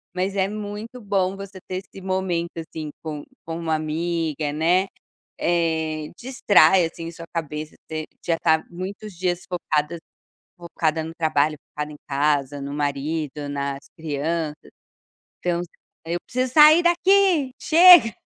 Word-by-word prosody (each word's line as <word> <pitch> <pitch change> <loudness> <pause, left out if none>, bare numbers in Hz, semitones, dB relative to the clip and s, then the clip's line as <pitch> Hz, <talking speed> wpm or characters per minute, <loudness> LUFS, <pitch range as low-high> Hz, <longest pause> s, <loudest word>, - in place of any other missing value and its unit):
Mas 190 +2 -1
é 190 0 +2
muito 210 +3 -6
bom 195 -3 0
você 195 -1 -9
ter 185 - -3
esse 195 - -13
momento, 185 -3 -1
assim, 160 -1 -6
com 150 -2 -5 0.2
com 165 0 -5
uma 160 -1 0
amiga, 155 -1 -2
né. 175 +5 +2 0.5
Eh, 160 -3 0
distrai, 195 -8 +4
assim, 165 0 -5
sua 165 0 -10
cabeça 155 -2 -4
te 155 -1 -4 0.2
já 165 -1 +1
tá 160 -1 +3
muitos 190 +3 -7
dias 180 0 -2
focadas 165 -2 -1 0.6
focada 165 -2 -1
no 160 +1 -7
trabalho, 155 -2 +1
focada 150 0 -5
em 150 - -11
casa, 145 -1 0
no 140 +1 -5
marido, 145 0 -2
nas 140 -1 -4
crianças, 155 0 -3 0.7
então: 175 -1 -1 0.4
"Eu 170 +1 -2
preciso 255 0 -1
sair 310 +2 +8
daqui, 345 -5 +3
Chega!". 335 -7 +7
165 Hz, 135 wpm, -23 LUFS, 155-190 Hz, 0.7 s, sair